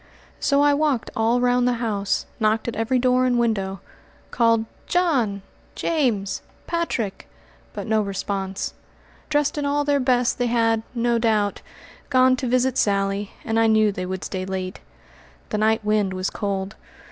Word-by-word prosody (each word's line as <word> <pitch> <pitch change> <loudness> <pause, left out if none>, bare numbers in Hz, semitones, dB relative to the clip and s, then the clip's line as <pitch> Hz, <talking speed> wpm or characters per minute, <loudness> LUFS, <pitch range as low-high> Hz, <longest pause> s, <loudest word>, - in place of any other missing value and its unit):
So 280 0 +3
I 290 0 +5
walked 285 -5 0
all 225 +2 +2
round 245 0 +2
the 250 - +2
house, 215 -4 -1
knocked 215 +1 +1
at 235 - -3
every 225 +4 +1
door 255 0 +3
and 245 -1 +2
window, 195 -6 0 0.5
called 230 -2 +3 0.2
"John!" 255 - +1 0.3
"James!" 240 -12 0 0.2
"Patrick!" 330 - -2 0.5
but - - -5
no 220 -1 +2
response. 195 -1 -3 0.6
Dressed 295 0 +1
in 290 - -2
all 290 +1 +1
their 285 -1 +2
best, 250 -2 +1
they 245 - +1
had, 225 -1 +2
no 235 0 +1
doubt, 215 -3 +1 0.5
gone 255 -1 +5
to 255 - -3
visit 255 +1 +2
Sally, 200 0 0
and 225 0 +1
I 225 - +4
knew 215 -1 +4
they 185 -2 -5
would 185 0 -4
stay 185 -1 -4
late. 185 0 -4 0.7
The 210 - -1
night 220 0 +2
wind 210 -2 +1
was 185 0 -2
cold. 195 -1 -3
225 Hz, 160 wpm, -23 LUFS, 200-255 Hz, 0.7 s, I